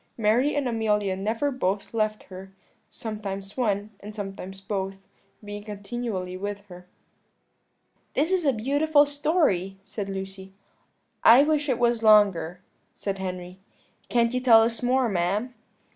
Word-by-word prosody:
Mary 235 +6 +2
and 285 -3 0
Amelia 210 -4 0
never 225 +9 -1
both 200 -6 -2
left 215 -1 -1
her; 190 0 -11 0.4
sometimes 205 -4 -6
one, 210 -4 -1
and 210 +1 -10
sometimes 195 -2 -7
both, 195 -1 -5 0.4
being 205 0 -7
continually 205 -2 -5
with 205 +2 -5
her." 180 0 -12 1.3
"This 315 +5 +1
is 375 -2 +2
a 280 - +4
beautiful 285 +6 +3
story," 285 - 0
said 200 -1 -5
Lucy. 190 0 -7 0.7
"I 245 +5 +8
wish 300 -1 +1
it 250 - +2
was 240 -1 +2
longer," 200 -6 +4 0.3
said 195 -1 -4
Henry; 180 -1 -6 0.5
"can't 235 0 +2
you 250 - +1
tell 230 -3 +7
us 230 0 -1
more, 255 +1 +2
ma'am?" 200 +5 -1
210 Hz, 135 wpm, -26 LUFS, 195-245 Hz, 1.3 s, I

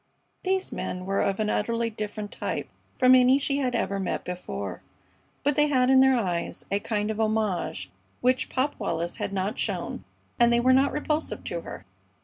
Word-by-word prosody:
These 380 0 -1
men 180 0 -4
were 195 +1 0
of 195 +1 0
an 215 -1 +1
utterly 230 +2 0
different 210 -1 -5
type - - -3 0.3
from 255 0 +6
any 255 +1 +6
she 280 0 0
had 255 -3 0
ever 200 -3 -1
met 190 - -2
before, 180 0 -5 0.6
but 290 -1 +2
they 295 0 +4
had 260 -3 +3
in 265 - +7
their 265 0 +6
eyes 180 -6 -2
a 200 - +2
kind 210 0 -1
of 220 - -5
homage 215 -4 -1 0.3
which 255 +1 +1
Pop 270 +3 0
Wallis 170 -4 -2
had - - -3
not 195 +2 -2
shown - - -2 0.4
and 235 0 +5
they 235 - +4
were 255 +2 +4
not 270 +2 +4
repulsive 300 +1 -2
to - - -4
her. - - -9
230 Hz, 185 wpm, -26 LUFS, 200-265 Hz, 0.6 s, in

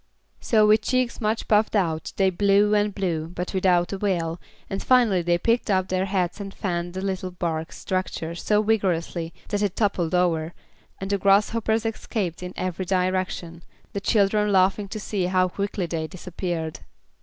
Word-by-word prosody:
So, 215 -2 +3
with 215 +1 +5
cheeks 255 +1 0
much 215 +1 -1
puffed 215 +1 +3
out 165 -6 0
they 190 -1 +3
blew 200 +2 +3
and 210 0 +2
blew, 175 -6 -2
but 180 +1 -5
without 180 -1 +2
avail, 175 -4 -1 0.3
and 195 - -4
finally 235 -8 +4
they 175 0 +2
picked 230 +6 +1
up 185 -2 +1
their 185 0 0
hats 185 -1 -1
and 200 -1 -6
fanned 175 -3 -3
the 190 - -3
little 190 -1 -2
bark 165 -3 -3
structure 185 -3 -3
so 210 +5 +1
vigorously 175 -6 0 0.2
that 205 -1 -1
it 200 -3 0
toppled 185 -6 0
over, 170 -2 +1 0.4
and 195 +1 -4
the 200 - +1
grasshoppers 220 +3 +2
escaped 210 -6 -3
in 180 0 -5
every 185 0 -3
direction, 185 -2 -1 0.3
the 200 - -3
children 210 0 +2
laughing 195 +2 +3
to 215 - -6
see 200 -2 -2
how 185 0 +2
quickly 200 0 -2
they 160 -1 -3
disappeared. 175 -2 -4
190 Hz, 165 wpm, -24 LUFS, 175-205 Hz, 0.4 s, with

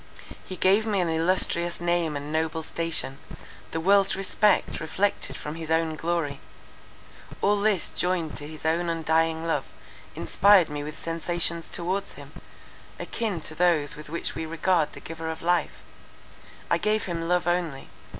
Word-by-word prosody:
He 185 - -7
gave 195 +5 +3
me 205 -3 +1
an 175 -2 +1
illustrious 170 +1 +1
name 170 -3 0
and 145 +2 -6
noble 160 0 -1
station; 160 -4 -2 0.5
the 160 - -3
world's 195 +3 +4
respect 195 +2 +2
reflected 190 +6 -1
from 150 - -5
his 160 -1 -7
own 160 -1 +1
glory: 165 -3 -2 1.0
all 205 +1 +2
this 205 -5 +2
joined 180 -3 -1
to 145 - -5
his 155 0 -10
own 170 +2 +1
undying 165 0 +1
love, 165 - 0 0.5
inspired 200 -3 +5
me 145 0 -4
with 150 +1 -7
sensations 170 0 -1
towards 185 +3 -2
him, - - -12 0.7
akin 215 -8 -3
to 155 - -4
those 165 -4 +2
with 150 0 -10
which 170 +2 -2
we 160 - -4
regard 165 0 +1
the - - -9
Giver 165 0 -6
of 160 - -6
life. 175 +1 0 0.8
I - - +2
gave 215 0 +1
him 165 -2 -3
love 180 0 +2
only. 175 -5 -1
165 Hz, 155 wpm, -26 LUFS, 160-180 Hz, 1.0 s, inspired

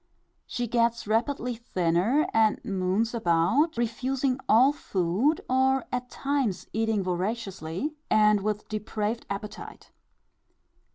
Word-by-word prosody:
She 245 - -2
gets 235 0 +1
rapidly 240 +3 0
thinner, 200 - +1
and 220 -1 +3
moons 195 +4 0
about, 225 - +2
refusing 255 +3 -1
all 255 +6 +6
food, 205 - 0
or 265 0 +2
at 250 0 -3
times 270 -9 -1
eating 220 -2 0
voraciously, 185 - -3 0.2
and 210 -1 +4
with 210 +1 -2
depraved 215 +1 -3
appetite. 200 +1 -7
225 Hz, 105 wpm, -27 LUFS, 200-250 Hz, 0.2 s, all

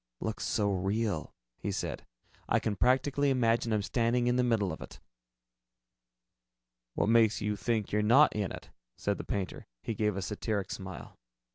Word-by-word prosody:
"Looks 110 0 -3
so 105 -2 +1
real," 95 -2 -1 0.3
he 100 - -2
said, 95 - -4 0.4
"I - - +4
can 105 - -1
practically 135 +4 +2
imagine 115 -3 +2
I'm 105 -2 +1
standing 120 +2 +1
in 120 0 +2
the 125 - +3
middle 110 -6 +1
of 80 - -7
it." - - -10 2.0
"What - - +1
makes 115 -1 +4
you 105 0 -1
think 105 +2 -1
you're 105 - +2
not 125 +8 +5
in 105 -3 -1
it?" - - -9 0.3
said 100 0 -1
the - - -4
painter. 95 -4 -4 0.2
He 115 - -2
gave 105 -2 0
a 95 - -2
satiric 105 -1 -2
smile. 95 -1 -8
110 Hz, 165 wpm, -31 LUFS, 100-120 Hz, 2.0 s, not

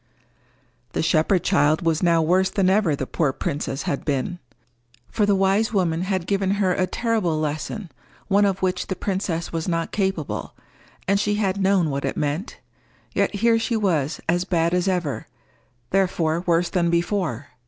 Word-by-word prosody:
The - - 0
shepherd 165 +2 +2
child 150 +3 +2
was 165 -2 +1
now 170 -2 +3
worse 185 +4 +3
than 190 -2 +2
ever 190 -7 +2
the 135 - -3
poor 150 +1 0
princess 140 -2 -3
had 140 - -2
been. 145 +5 -2 0.7
For 210 -2 +1
the 200 - +4
wise 195 +4 +2
woman 175 -4 +1
had 185 -2 -1
given 195 0 0
her 190 -3 +2
a 185 - 0
terrible 210 -7 0
lesson 155 +5 -3 0.4
one 205 0 +3
of 195 -1 -1
which 180 -1 0
the 190 - -2
princess 185 -5 -3
was 165 +1 -2
not 165 -2 -1
capable, 190 -7 -2 0.5
and 200 +1 +3
she 210 0 +1
had 200 -2 0
known 190 -5 +2
what 140 0 -3
it - - -2
meant; 150 - -2 0.6
yet - - +1
here 225 +2 +3
she 225 0 0
was 160 -8 0
as 175 +2 +2
bad 170 -2 +1
as 180 +1 +1
ever, 175 -7 -1 0.6
therefore 175 -4 +1
worse 170 0 +2
than 175 -3 +1
before. 170 - -1
180 Hz, 170 wpm, -23 LUFS, 160-195 Hz, 0.7 s, the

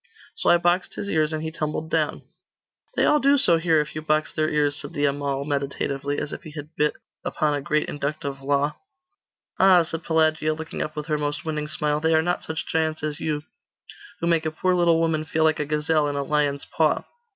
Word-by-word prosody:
So - - 0
I 175 - +7
boxed 175 +2 +1
his 200 - -4
ears, 155 -1 +2
and 155 0 -3
he 160 - -3
tumbled 155 0 -3
down.' 155 -2 0 0.7
'They - - +3
all 300 - +4
do 280 +1 +4
so 170 -10 +4
here, 165 -1 +3
if 150 - -6
you 155 - -4
box 155 0 0
their 155 0 +1
ears,' 145 -1 +1
said 155 - -6
the 145 -2 +1
Amal 140 -1 -1
meditatively, 140 0 -2
as 150 - -3
if - - -6
he 165 - -10
had 150 +1 -9
bit 150 0 +1 0.3
upon 150 -1 0
a 145 - -1
great 150 +2 0
inductive 140 -1 -4
law. 140 +2 0 0.8
'Ah,' 185 -2 +7
said 165 0 -5
Pelagia, 155 -1 +2
looking 160 +1 -5
up 155 - -3
with 150 -1 -4
her 150 -1 -1
most 145 +1 -3
winning 155 -1 -2
smile, 150 -1 0
'they 160 +1 +2
are 160 - +3
not 175 +1 0
such 160 -1 -4
giants 155 -1 -1
as 150 -1 -2
you, 150 -2 -2 0.8
who - - 0
make 165 -2 +2
a - - +1
poor 185 +4 0
little 170 -2 +3
woman 160 -2 +1
feel 160 0 0
like 155 0 +3
a 150 - 0
gazelle 150 0 +1
in 145 - -2
a 140 - -1
lion's 145 -1 0
paw! 155 -1 +1
155 Hz, 220 wpm, -24 LUFS, 150-160 Hz, 0.8 s, I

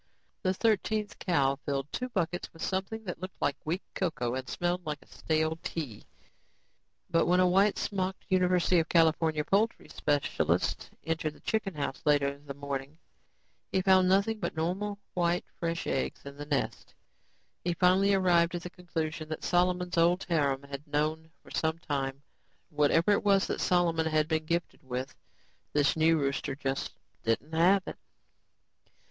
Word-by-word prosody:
The 185 -1 +1
thirteenth 215 0 0
cow 140 -6 +2
filled 140 0 -2
two 250 +1 -2
buckets 180 -5 -2
with 165 - -9
something 195 +4 -2
that 180 -5 -5
looked 185 0 -7
like 145 -1 +1
weak 170 +5 -2
cocoa 140 -10 -1
and 130 -1 -4
smelled 175 +1 -1
like 150 -2 -3
stale 155 0 -1
tea. 140 -11 -5 1.1
But 165 -1 +3
when 180 +1 +4
a 185 - +5
white 195 +3 +4
smocked 190 -2 -2
University 180 -1 +3
of 165 - -1
California 160 -2 +3
poultry 215 +4 +1
specialist 145 -1 0
entered 160 -2 -1
the - - -17
chicken 210 -5 -1
house 140 -2 -3
later 145 -2 +3
in 140 +1 -6
the 140 - -5
morning, 140 +1 -5 0.7
he 190 - +1
found 185 -1 +5
nothing 200 +3 +2
but - - -3
normal, 190 +6 -2 0.2
white 175 0 +1
fresh 170 0 -2
eggs 135 - -2
in 140 0 -8
the 145 0 -8
nests. 140 -3 -2 0.7
He 175 0 0
finally 190 +3 +4
arrived 175 -2 +3
at 175 - -4
the 180 - -6
conclusion 160 -3 -4
that 155 - -5
Solomon's 180 0 +1
old 175 +3 +3
harem 140 -6 +1
had 140 +2 -8
known 155 +2 -1
for - - -15
some 160 0 0
time; 140 -4 -3 0.5
whatever 155 +5 +3
it 205 - +2
was 200 -1 +4
that - - -3
Solomon 170 -3 +2
had 155 -1 +2
been 160 -1 0
gifted 170 +1 -2
with, 130 +1 -4 0.6
this 145 -1 +3
new 160 +1 +4
rooster 140 -1 -1
just 135 -1 -3 0.3
didn't 115 +7 -1
have 185 +4 +4
it. - - -7
165 Hz, 160 wpm, -30 LUFS, 145-185 Hz, 1.1 s, a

